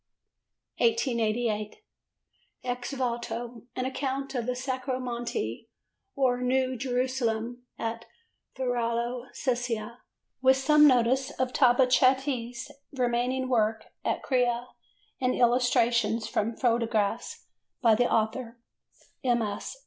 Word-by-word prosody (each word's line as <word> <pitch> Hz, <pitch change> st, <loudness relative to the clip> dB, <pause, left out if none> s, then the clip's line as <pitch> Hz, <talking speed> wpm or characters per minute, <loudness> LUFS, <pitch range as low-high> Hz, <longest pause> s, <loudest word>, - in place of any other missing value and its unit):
1888. 235 Hz, -, +1 dB, 0.9 s
Ex 245 Hz, +1 st, -3 dB
Voto: 240 Hz, -2 st, -4 dB
an 255 Hz, -, -2 dB
account 270 Hz, +1 st, -3 dB
of 245 Hz, -3 st, -2 dB
the 250 Hz, -, 0 dB
Sacro 260 Hz, 0 st, -3 dB
Monte 235 Hz, -, -4 dB, 0.5 s
or 250 Hz, -2 st, +2 dB
New 255 Hz, +1 st, +1 dB
Jerusalem 245 Hz, -1 st, -1 dB
at 230 Hz, 0 st, -4 dB, 0.5 s
Varallo 240 Hz, -1 st, -1 dB
Sesia, 240 Hz, -3 st, -2 dB, 0.4 s
with 260 Hz, 0 st, +5 dB
some 300 Hz, +3 st, +6 dB
notice 260 Hz, +1 st, +3 dB
of 260 Hz, -3 st, -2 dB
Tabachetti's 255 Hz, -1 st, +3 dB, 0.2 s
remaining 255 Hz, 0 st, 0 dB
work 220 Hz, -3 st, +1 dB
at -, -, -1 dB
Crea 245 Hz, -3 st, +1 dB, 0.6 s
and 255 Hz, -1 st, +2 dB
illustrations 235 Hz, -2 st, +2 dB
from 225 Hz, 0 st, -1 dB
photographs 230 Hz, -4 st, 0 dB, 0.4 s
by 230 Hz, -2 st, +6 dB
the 240 Hz, +3 st, +2 dB
author: 230 Hz, +2 st, 0 dB, 0.7 s
MS. 235 Hz, -, -1 dB
245 Hz, 95 wpm, -28 LUFS, 230-260 Hz, 0.9 s, some